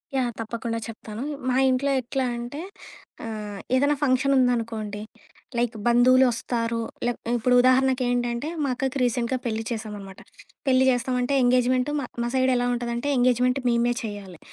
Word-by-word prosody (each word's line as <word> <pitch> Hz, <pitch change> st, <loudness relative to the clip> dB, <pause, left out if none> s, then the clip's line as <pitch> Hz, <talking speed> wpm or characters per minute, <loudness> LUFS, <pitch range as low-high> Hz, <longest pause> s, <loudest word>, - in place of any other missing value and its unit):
Yeah! 250 Hz, -2 st, +1 dB
తప్పకుండా 230 Hz, 0 st, -3 dB
చెప్తాను. 220 Hz, 0 st, -8 dB, 0.3 s
మా 255 Hz, -, +2 dB
ఇంట్లో 270 Hz, +2 st, +1 dB
ఎట్లా 265 Hz, +2 st, -2 dB
అంటే 240 Hz, +6 st, -6 dB, 0.6 s
ఆహ్, 210 Hz, -2 st, -6 dB, 0.2 s
ఏదన్నా 285 Hz, +3 st, +3 dB
ఫంక్షన్ 270 Hz, 0 st, +2 dB
ఉందనుకోండి. 225 Hz, -4 st, 0 dB, 0.6 s
లైక్ 240 Hz, 0 st, 0 dB
బంధువులోస్తారు 240 Hz, -1 st, +3 dB, 0.3 s
లే 245 Hz, -, +2 dB, 0.3 s
ఇప్పుడు 250 Hz, +2 st, +2 dB
ఉదాహరణకేంటంటే, 255 Hz, -1 st, +2 dB, 0.2 s
మా 280 Hz, -, 0 dB
అక్కకి 265 Hz, +1 st, -2 dB
రీసెంట్‌గా 245 Hz, +1 st, 0 dB
పెళ్లి 225 Hz, -1 st, -2 dB
చేసాం 220 Hz, -2 st, -4 dB
అనమాట. 195 Hz, -1 st, -11 dB, 0.5 s
పెళ్లి 260 Hz, 0 st, +4 dB
చేస్తామంటే 250 Hz, +1 st, 0 dB
ఎంగేజ్మెంట్ 250 Hz, +2 st, +2 dB
మా 280 Hz, -, -3 dB, 0.2 s
మా -, -, -1 dB
సైడ్ 260 Hz, 0 st, +3 dB
ఎలా 245 Hz, 0 st, +1 dB
ఉంటదంటే, 240 Hz, +2 st, -3 dB
ఎంగేజ్మెంట్ 250 Hz, +1 st, +2 dB
మేమే 240 Hz, 0 st, +2 dB
చేయాలి. 200 Hz, -5 st, -7 dB
245 Hz, 135 wpm, -25 LUFS, 230-255 Hz, 0.6 s, పెళ్లి